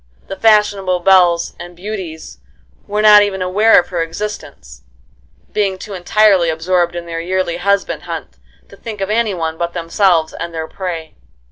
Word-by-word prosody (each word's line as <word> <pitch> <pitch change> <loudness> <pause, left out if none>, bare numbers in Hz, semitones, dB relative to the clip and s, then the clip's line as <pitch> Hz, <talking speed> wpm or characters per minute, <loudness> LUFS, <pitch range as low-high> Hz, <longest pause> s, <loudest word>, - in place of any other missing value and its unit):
The 195 - -4
fashionable 205 -4 +2
belles 175 -2 +3
and 175 0 -10
beauties 180 - -7 0.5
were 210 +1 -1
not 210 -1 +8
even 195 -2 -1
aware 210 +5 +4
of 175 - -4
her 175 -2 -2
existence, 165 - -7 0.7
being 195 -3 0
too 205 +2 -9
entirely 190 -1 +3
absorbed 175 +2 0
in 170 0 -5
their 165 -1 -5
yearly 180 -1 -2
husband 200 +2 0
hunt - - -6 0.3
to - - -14
think 220 -3 -8
of 195 +1 -2
any 220 -3 0
one 160 -2 -4
but 170 0 -2
themselves 170 -1 +1
and 170 -1 -6
their 160 0 -4
prey. 170 -4 -6
185 Hz, 160 wpm, -16 LUFS, 170-205 Hz, 0.7 s, not